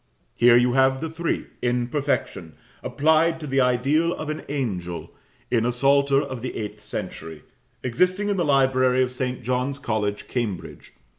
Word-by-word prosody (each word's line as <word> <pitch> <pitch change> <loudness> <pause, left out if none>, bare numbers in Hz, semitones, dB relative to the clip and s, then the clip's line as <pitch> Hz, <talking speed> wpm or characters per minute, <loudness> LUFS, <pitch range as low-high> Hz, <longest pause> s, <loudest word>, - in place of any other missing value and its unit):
Here 120 0 +6
you 120 0 +3
have 130 0 +3
the 160 +1 -4
three, 165 +1 -2 0.2
in 120 0 0
perfection, 130 - -2 0.3
applied 160 +2 +2
to 155 - -7
the 135 -1 +1
ideal 135 +7 +2
of 155 - -6
an 155 0 -3
angel, 95 -12 -4 0.4
in 115 -2 +2
a 120 - +1
psalter 140 +2 +3
of 130 -3 -5
the 125 - -5
eighth 105 -2 -6
century, 80 -2 -6 0.4
existing 180 - +1
in 205 -1 0
the 175 - +1
library 130 -3 +3
of 125 - -2
St. 125 -1 -3
John's 125 +3 -1
College, 110 -6 -2
Cambridge. 110 -8 -5
130 Hz, 160 wpm, -24 LUFS, 120-145 Hz, 0.4 s, Here